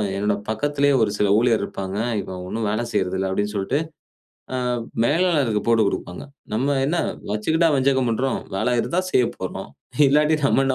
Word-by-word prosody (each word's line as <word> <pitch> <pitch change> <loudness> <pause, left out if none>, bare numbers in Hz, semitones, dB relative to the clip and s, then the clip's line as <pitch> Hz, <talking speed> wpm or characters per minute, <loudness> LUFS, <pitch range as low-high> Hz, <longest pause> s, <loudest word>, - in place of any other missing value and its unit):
என்னோட 105 +1 0
பக்கத்திலேயே 145 +4 +1
ஒரு 105 - +1
சில 105 - +3
ஊழியர் 115 -3 +2
இருப்பாங்க, 95 0 -5 0.2
இவன் 90 -1 -7
ஒண்ணும் 110 +3 -2
வேல 110 +2 -1
செய்றதில்ல 95 +1 0
அப்பிடின்னு 105 +2 -2
சொல்ட்டு, 100 +9 0 0.8
ஆ - - 0 0.5
மேலாளருக்கு 145 -7 +2
போட்டு 115 -1 +4
கொடுப்பாங்க, 90 -2 -5 0.3
நம்ம 135 +5 +1
என்ன 170 +5 0 0.4
வச்சுக்கிட்டா 160 +11 +2
வஞ்சகம் 130 -2 +2
பண்றோம்! 130 +4 -1 0.2
வேல 125 +5 +1
இருந்தா 175 +8 0
செய்யப் 125 - +2
போறோம், - - -6 0.4
இல்லாட்டி 150 +2 +3
நம்ம 135 - +3
என்ன 130 - +1
120 Hz, 155 wpm, -22 LUFS, 105-140 Hz, 0.8 s, போட்டு